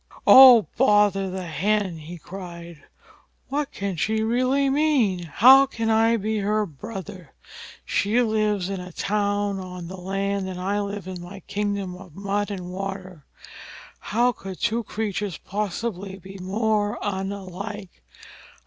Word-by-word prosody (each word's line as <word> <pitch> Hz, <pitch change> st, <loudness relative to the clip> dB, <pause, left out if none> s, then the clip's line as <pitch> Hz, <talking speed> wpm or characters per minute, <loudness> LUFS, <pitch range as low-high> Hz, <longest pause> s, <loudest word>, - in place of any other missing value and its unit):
"Oh, 255 Hz, -5 st, +9 dB
bother 205 Hz, -5 st, +3 dB
the 185 Hz, 0 st, -5 dB
Hen!" 185 Hz, +2 st, -1 dB
he 165 Hz, +3 st, -9 dB
cried, 170 Hz, -3 st, -10 dB, 0.6 s
"what 290 Hz, +1 st, -2 dB
can 195 Hz, -3 st, -4 dB
she 220 Hz, +8 st, 0 dB
mean, -, -, -1 dB
really? 260 Hz, -, +2 dB
How 265 Hz, -, +7 dB
can 225 Hz, -4 st, -2 dB
I 225 Hz, +1 st, +3 dB
be 215 Hz, +1 st, -2 dB
her 210 Hz, +1 st, 0 dB
brother? 185 Hz, -, -9 dB, 0.5 s
She 210 Hz, +4 st, +1 dB
lives 215 Hz, -5 st, +1 dB
in 195 Hz, -1 st, -4 dB
a 180 Hz, 0 st, -8 dB
town 205 Hz, +1 st, -1 dB
on 180 Hz, -2 st, -8 dB
the 190 Hz, -, -8 dB
land, 195 Hz, +1 st, -2 dB
and 180 Hz, -1 st, -6 dB
I 200 Hz, +3 st, -1 dB
live 200 Hz, -2 st, -4 dB
in 185 Hz, -2 st, -6 dB
my 185 Hz, +3 st, -10 dB
kingdom 200 Hz, -3 st, -3 dB
of 180 Hz, -4 st, -13 dB
mud 200 Hz, +1 st, -2 dB
and 180 Hz, -3 st, -6 dB
water. 185 Hz, -4 st, -6 dB, 0.7 s
How 240 Hz, +4 st, +1 dB
could 195 Hz, -5 st, -9 dB
two 235 Hz, +1 st, 0 dB
creatures 205 Hz, -4 st, -3 dB
possibly 200 Hz, -1 st, -4 dB
be 195 Hz, +1 st, -11 dB
more 210 Hz, +2 st, 0 dB
unlike? 195 Hz, 0 st, -5 dB
200 Hz, 140 wpm, -24 LUFS, 185-215 Hz, 0.7 s, Oh